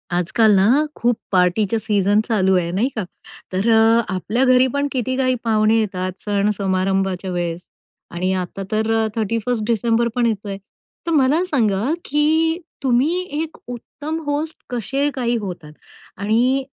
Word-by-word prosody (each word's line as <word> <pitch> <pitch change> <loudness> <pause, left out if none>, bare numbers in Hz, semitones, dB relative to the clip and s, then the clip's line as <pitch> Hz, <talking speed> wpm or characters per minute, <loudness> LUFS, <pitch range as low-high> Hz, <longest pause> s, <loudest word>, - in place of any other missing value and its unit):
आजकाल 195 +5 +3
ना, 190 0 +4 0.3
खूप 240 -1 +1
पार्टीच्या 190 +4 +2
सीझन 205 -2 +2
चालू 190 -4 +2
आहे, 170 -1 -1
नाही 200 +8 +1
का. 215 - -2 0.5
तर 195 +5 +1
अ, 225 +1 +5
आपल्या 215 +7 -1
घरीपण 260 +2 +3
किती 260 0 -1
काही 255 -1 +2
पाहुणे 220 -1 +3
येतात, 185 -3 -2
सण 205 0 +1
समारंभाच्या 190 -1 -1
वेळेस 175 -1 -3 0.5
आणि 185 +2 -1
आता 185 +1 -4
तर 220 +1 0
अ, 220 0 +1
31st 225 +1 -1
डिसेंबर 230 +1 +1
पण 245 -1 +2
येतोय! 205 -3 -2 0.5
तर - - 0
मला 295 +2 +3
सांगा, 220 - 0 0.2
की 320 +3 +1 0.2
तुम्ही 275 +8 +2 0.2
एक 320 0 -6
उत्तम 290 +6 -6
होस्ट 295 +2 -2
कसे 270 +4 -1
काही 240 -2 0
होतात? 180 -8 -7 0.5
आणि 235 +7 +1
225 Hz, 145 wpm, -20 LUFS, 195-255 Hz, 0.5 s, अ